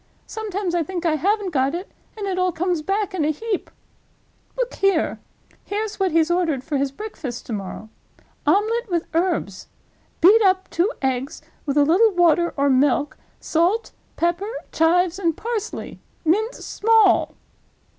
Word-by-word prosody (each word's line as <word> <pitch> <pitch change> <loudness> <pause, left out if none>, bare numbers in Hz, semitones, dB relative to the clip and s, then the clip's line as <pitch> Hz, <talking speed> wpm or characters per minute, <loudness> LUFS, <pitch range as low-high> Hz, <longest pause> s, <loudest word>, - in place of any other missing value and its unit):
Sometimes 405 -4 -4
I 345 - +2
think 350 +1 -4
I 325 - +3
haven't 395 +4 0
got 270 0 +1
it, 360 +3 -6 0.3
and 415 - -4
it 375 -2 -2
all 365 0 +2
comes 350 0 -1
back 395 +3 -1
in 355 -5 -1
a 300 - +1
heap. 405 +6 -3 0.9
Look - - -1
here! 390 -5 +1 0.4
Here's 420 0 -4
what 380 -2 +1
he's 325 +1 +2
ordered 330 -7 0
for 290 +1 -2
his 275 0 0
breakfast 310 - -7
to 235 - -5
morrow: 200 +1 -6 0.6
'Omelette 455 +3 +2
with 340 -2 0
Herbs. 330 - -1 0.5
Beat 405 +7 +7
up 380 -2 +3
two 360 +7 +1
eggs 265 +1 -2 0.2
with 280 +1 0
a 290 - +5
little 375 +9 +5
water 345 -1 +3
or 280 +1 +2
milk, 275 +2 +2 0.2
salt, 355 +8 0 0.2
pepper, 345 +4 0 0.2
chives, 350 +3 +2
and 335 -4 0
parsley. 455 -3 -4 0.3
Mince 430 +9 0
small. 440 -3 +3
355 Hz, 155 wpm, -22 LUFS, 310-405 Hz, 0.9 s, Beat